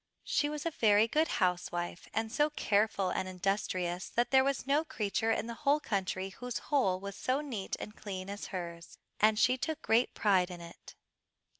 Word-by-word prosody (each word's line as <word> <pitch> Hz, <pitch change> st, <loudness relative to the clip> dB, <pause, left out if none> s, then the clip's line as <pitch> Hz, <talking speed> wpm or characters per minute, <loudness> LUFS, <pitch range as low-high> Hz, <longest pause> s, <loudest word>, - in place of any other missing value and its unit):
She 290 Hz, 0 st, +1 dB
was 300 Hz, 0 st, -5 dB
a 335 Hz, -, 0 dB
very 215 Hz, -5 st, +4 dB
good 310 Hz, +7 st, +2 dB
housewife, 175 Hz, -3 st, -1 dB
and 220 Hz, 0 st, -2 dB
so 295 Hz, +5 st, +2 dB
careful 205 Hz, -8 st, +1 dB
and 190 Hz, -, -1 dB
industrious 185 Hz, -1 st, -1 dB
that 240 Hz, +1 st, 0 dB
there 265 Hz, -1 st, +6 dB
was 275 Hz, -1 st, -1 dB
no 285 Hz, +3 st, +3 dB
creature 220 Hz, -5 st, -1 dB
in 225 Hz, -, 0 dB
the 235 Hz, -, -5 dB
whole 295 Hz, +1 st, +3 dB
country 190 Hz, -5 st, -2 dB
whose 245 Hz, +5 st, -5 dB
hole 195 Hz, -11 st, +1 dB
was 200 Hz, 0 st, -6 dB
so 255 Hz, +5 st, 0 dB
neat 245 Hz, -10 st, -4 dB
and 210 Hz, -, -7 dB
clean 190 Hz, -3 st, -6 dB
as 200 Hz, +1 st, -6 dB
hers, 170 Hz, -3 st, -7 dB, 0.2 s
and 215 Hz, 0 st, +4 dB
she 255 Hz, +3 st, +3 dB
took 315 Hz, +2 st, -3 dB
great 230 Hz, +3 st, +2 dB
pride 190 Hz, -4 st, +3 dB
in 180 Hz, -1 st, -7 dB
it. 170 Hz, 0 st, -12 dB
210 Hz, 185 wpm, -32 LUFS, 185-260 Hz, 0.2 s, there